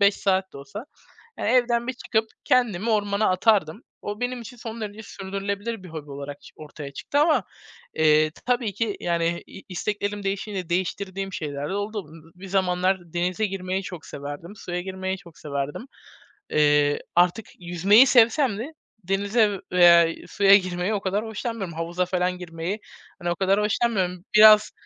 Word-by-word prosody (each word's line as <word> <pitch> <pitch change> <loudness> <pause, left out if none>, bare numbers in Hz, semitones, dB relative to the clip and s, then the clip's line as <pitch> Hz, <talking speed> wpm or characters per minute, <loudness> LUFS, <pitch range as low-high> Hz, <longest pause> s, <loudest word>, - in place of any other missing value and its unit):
5 200 0 +5
saat 190 -1 0
de - - -9
olsa, 205 - -9 0.5
eee, - - -3
evden 235 0 +2
bir 260 - -1
çıkıp 225 -3 -1 0.2
kendimi 230 -4 +2
ormana 205 -1 +1
atardım. 195 0 +2 0.2
O 205 +3 -5
benim 245 0 -2
için 235 +2 -10
son 230 -1 -7
derece 210 0 -6
sürdürülebilir 200 +2 -5
bir 185 - -10
hobi 155 -3 -8
olarak 140 +1 -7
ç - - -13
ortaya 150 -2 -9
çıktı 285 - -2
ama, 305 +1 +3 0.5
eee, 155 0 +4
t - - -19
tabii 245 -4 +1
ki, 225 -3 -1
yani, 170 0 0
i 195 - -12
isteklerim 205 +2 -3
değişince 195 -2 -3
değiştirdiğim 190 +2 -2
şeyler 145 -3 -4
de - - -2
oldu. 205 -2 -3
B 165 +2 -16
b - - -20
bir - - -7
zamanlar 185 0 +1
denize 180 +4 0
girmeyi 190 -1 -3
çok 180 -4 -8
severdim, 145 +8 -8
suya 175 -2 -4
girmeyi 190 +1 -4
çok 170 -4 -16
severdim. 140 - -4 0.7
Eee, 145 -1 +3 0.2
artık 180 +5 +3
yüzmeyi 185 +8 +5
sevsem 235 -1 +4
de 265 +9 -6 0.3
denize 200 +2 +1
veya, 175 -1 +7
iii, 165 - -7
suya 200 -1 +6
girmeyi 180 +1 -2
o 205 - -1
kadar 200 +3 -1
hoşlanmıyorum; 220 -4 -4
havuza 170 +2 -1
falan 180 0 -1
girmeyi, 175 +3 -5 0.4
hani, 175 -1 -2
o - - -1
kadar 195 +2 +2
hoşlanmıyorum. 200 -5 0
Biraz 215 0 +8
195 Hz, 165 wpm, -24 LUFS, 175-215 Hz, 0.7 s, Biraz